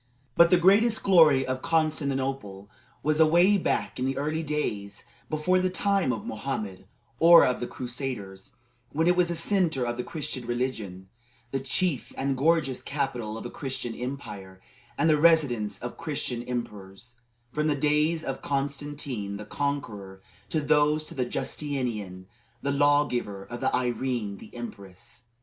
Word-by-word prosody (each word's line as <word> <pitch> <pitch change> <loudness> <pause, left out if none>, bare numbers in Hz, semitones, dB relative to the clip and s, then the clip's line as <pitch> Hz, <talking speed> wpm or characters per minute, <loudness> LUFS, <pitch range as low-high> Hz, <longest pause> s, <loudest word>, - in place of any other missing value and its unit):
But 170 0 +6
the 180 - +6
greatest 205 +6 +4
glory 155 -8 +6
of 130 0 -3
Constantinople 135 -10 -1 0.3
was 155 +2 +1
away 175 +6 +5
back - - -1
in 130 - 0
the 135 0 -1
early 155 +3 -1
days 105 -11 -3 0.2
before 155 +4 +2
the 185 0 +1
time 195 -5 +1
of 115 - -4
Mohammed, 105 -5 -5 0.3
or 170 +1 +8
of 125 - 0
the 120 - -3
Crusaders, 125 -3 -6 0.4
when 160 +2 +1
it 180 +1 +4
was 180 -1 +3
the 170 - -2
centre 165 -6 +1
of 120 0 -3
the 125 - -2
Christian 135 -6 -5
religion, 115 -7 -3 0.4
the 135 - -1
chief 140 +2 0
and 135 0 0
gorgeous 150 -1 +1
capital 125 -6 -3
of - - -8
a 120 - -5
Christian 130 -4 -4
empire, 105 -8 -7 0.4
and 165 - +2
the 155 -2 +4
residence 125 -12 +3
of 120 +3 -7
Christian 145 -7 -3
emperors, 115 -3 -6 0.4
from 150 +2 0
the 150 - +2
days 150 +3 +1
of 135 -1 -4
Constantine 140 -6 -2
the 105 - -8
conqueror 110 -8 -4 0.3
to 155 - 0
those 150 +1 +2
of 125 -3 -2
Justinian 120 -10 -3 0.4
the 140 - 0
law 145 +1 +4
giver 105 -7 -4
and 120 +4 -8
of - - +2
Irene 120 -4 -1
the - - -13
empress. 115 0 -9
135 Hz, 155 wpm, -27 LUFS, 120-155 Hz, 0.4 s, or